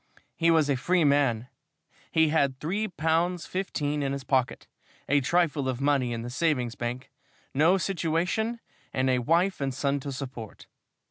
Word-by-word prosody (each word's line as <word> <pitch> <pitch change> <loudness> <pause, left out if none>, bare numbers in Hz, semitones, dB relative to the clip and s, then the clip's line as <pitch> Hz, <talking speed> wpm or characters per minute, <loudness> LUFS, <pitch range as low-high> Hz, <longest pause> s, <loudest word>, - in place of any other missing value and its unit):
He 170 0 +2
was 160 -3 +4
a 140 - +2
free 175 +7 +2
man. 140 -5 +2 0.6
He 160 -1 +4
had 140 -4 +1
three 200 +8 -1
pounds 170 0 0
fifteen 150 -6 -2
in 135 -1 -1
his 140 -1 -5
pocket, 130 -2 0 0.4
a 145 0 +3
trifle 150 -2 +1
of 125 -1 -3
money 140 -3 +1
in 115 -1 -3
the 120 - -6
savings 130 -5 0
bank, 125 +3 -5 0.4
no 160 +7 +4
situation, 190 +6 -1 0.3
and 130 0 +1
a 125 - +2
wife 170 +8 +1
and 135 -1 0
son 140 +2 -1
to 140 +1 -5
support. 125 -5 -7
145 Hz, 160 wpm, -27 LUFS, 130-165 Hz, 0.6 s, was